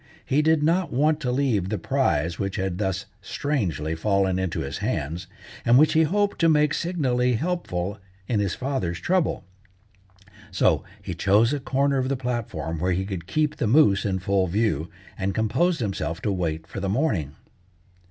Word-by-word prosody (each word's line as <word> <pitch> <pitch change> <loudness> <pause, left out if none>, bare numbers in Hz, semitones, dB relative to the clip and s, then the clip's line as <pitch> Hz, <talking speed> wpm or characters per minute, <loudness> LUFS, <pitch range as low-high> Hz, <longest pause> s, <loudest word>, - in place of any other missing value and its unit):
He 145 +2 +2
did 160 -1 +3
not 170 +3 +1
want 150 +4 +2
to 125 -5 -1
leave 125 -8 +1
the 110 - -1
prize 85 -1 0
which 95 -1 -2
had 95 -1 -2
thus 95 -3 -1 0.2
strangely 95 - -2
fallen 95 +2 +1
into 95 -2 -2
his 70 0 -4
hands, 85 +6 -3 0.4
and 120 +1 +5
which 155 +3 +5
he 160 - +4
hoped 200 +6 +1
to 165 - +4
make 150 -1 +3
signally 130 -8 0
helpful 110 - -2 0.3
in 115 -4 +1
his 100 -3 0
father's 125 -11 -2
trouble. 180 - 0 1.0
So - - +2 0.2
he 95 - -4
chose 105 - +3
a 145 - -1
corner 140 +1 +1
of 130 0 -1
the 140 - 0
platform 105 - -3
where 90 +2 +1
he 95 +2 -1
could 95 -4 -5
keep 155 +7 0
the 120 - 0
moose 105 -5 +4
in 95 -2 0
full 95 0 +1
view, 85 -5 0 0.3
and 95 0 -1
composed 160 +10 +1
himself 95 -5 -2
to 105 - +1
wait 80 -4 -2
for 100 - -7
the 95 0 -2
morning. 95 - 0
105 Hz, 175 wpm, -24 LUFS, 95-145 Hz, 1.0 s, and